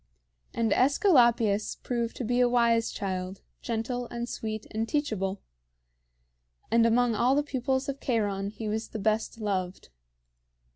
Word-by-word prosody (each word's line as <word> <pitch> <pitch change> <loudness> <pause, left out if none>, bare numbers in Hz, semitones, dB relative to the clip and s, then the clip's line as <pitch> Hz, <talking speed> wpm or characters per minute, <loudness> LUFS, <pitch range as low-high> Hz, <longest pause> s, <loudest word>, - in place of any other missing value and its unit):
And 230 -1 +1
AEsculapius 240 - +3
proved 235 -2 -2
to - - -4
be 245 +2 0
a 245 -1 +4
wise 235 -2 +3
child, 185 -1 -4 0.2
gentle 240 +2 -3
and 235 0 -5
sweet 220 -2 -5
and 225 +1 -2
teachable; 205 - -1 1.3
and 230 0 +5
among 240 +1 +3
all 240 +5 +3
the 290 - +2
pupils 265 -1 -1
of 275 0 -4
Cheiron 205 -5 -1
he 215 +1 -6
was 220 +1 -2
the - - -6
best 220 +2 -1
loved. 190 - -3
230 Hz, 140 wpm, -28 LUFS, 210-245 Hz, 1.3 s, and